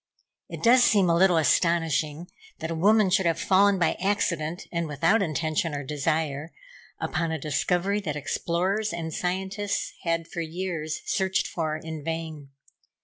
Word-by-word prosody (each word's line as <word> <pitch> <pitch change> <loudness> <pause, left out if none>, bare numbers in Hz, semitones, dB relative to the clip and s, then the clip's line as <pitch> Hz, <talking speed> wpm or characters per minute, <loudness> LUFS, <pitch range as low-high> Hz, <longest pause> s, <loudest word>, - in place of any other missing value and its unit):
It - - -8
does 245 +1 +6
seem 195 -7 +4
a - - +3
little 180 0 +4
astonishing 165 -1 +1 0.3
that 160 +1 -5
a - - 0
woman 200 +4 +3
should 190 -1 +3
have 165 - 0
fallen 200 +1 +4
by 170 -3 +2
accident, 175 -4 -1
and 170 -1 -2
without 155 +9 +2
intention 155 -2 -1
or 145 - -4
desire, 150 +1 -2 0.5
upon 170 -2 -2
a 160 - -1
discovery 175 +7 0
that 155 -6 -3
explorers 185 +8 -1
and 165 -2 -4
scientists 190 +4 -2
had 165 -1 -1
for 170 - -5
years 165 -1 -4
searched 190 -1 0
for 155 -2 -2
in 160 -1 -7
vain. 160 -3 -5
170 Hz, 150 wpm, -26 LUFS, 155-190 Hz, 0.5 s, does